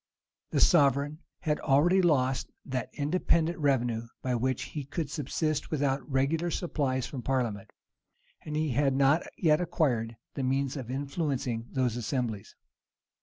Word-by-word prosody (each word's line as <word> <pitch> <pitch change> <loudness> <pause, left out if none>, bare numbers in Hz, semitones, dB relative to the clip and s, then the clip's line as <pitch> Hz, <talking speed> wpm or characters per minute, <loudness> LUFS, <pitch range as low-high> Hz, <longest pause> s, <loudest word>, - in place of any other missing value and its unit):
The - - 0
sovereign 145 -2 +4 0.2
had 150 -3 0
already 160 +7 +4
lost 135 -6 +2 0.2
that 130 -4 -3
independent 165 +2 +1
revenue 120 -5 +1 0.2
by 130 - 0
which 130 +2 0
he 150 - -5
could 145 +1 -4
subsist 155 +2 -1
without 140 -2 -1
regular 150 +6 +1
supplies 140 -7 -1
from 130 - -6
parliament; 120 -7 -1 0.7
and 150 - -5
he 155 0 0
had 135 +1 +2
not 140 +4 +4 0.2
yet 155 -2 +3
acquired 125 -10 0 0.2
the - - -3
means 135 +1 0
of 130 -4 -6
influencing 135 -4 -2
those 125 -3 0
assemblies. 120 -3 -3
140 Hz, 135 wpm, -29 LUFS, 130-155 Hz, 0.7 s, sovereign